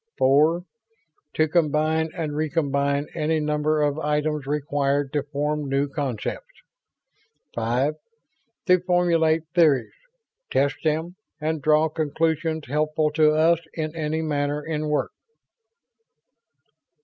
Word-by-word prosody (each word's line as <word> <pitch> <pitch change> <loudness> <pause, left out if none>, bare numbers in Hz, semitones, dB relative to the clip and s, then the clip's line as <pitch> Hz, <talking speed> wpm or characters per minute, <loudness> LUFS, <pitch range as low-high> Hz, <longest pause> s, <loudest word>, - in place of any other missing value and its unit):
Four, 155 +6 +3 0.7
to 155 - +3
combine 160 0 +1
and 155 -3 -3
recombine 140 -2 0
any 155 +1 0
number 150 0 0
of 145 +1 0
items 150 -1 -1
required 145 -1 -1
to 145 - +1
form 145 +1 -2
new 140 +1 +1
concepts. 140 - -5 0.9
Five, 125 +6 0 0.7
to 180 0 +5
formulate 170 -3 +2
theories, 155 -7 +3 0.6
test 140 +1 +1
them 160 +3 -1 0.2
and 155 0 -2
draw 155 +1 +4
conclusions 160 +1 -1
helpful 155 +2 0
to 155 0 +3
us 160 +1 +4 0.2
in 155 -1 -3
any 160 0 -2
matter 145 -1 -1
in 155 -1 -2
work." 150 - 0
150 Hz, 110 wpm, -24 LUFS, 145-160 Hz, 0.9 s, to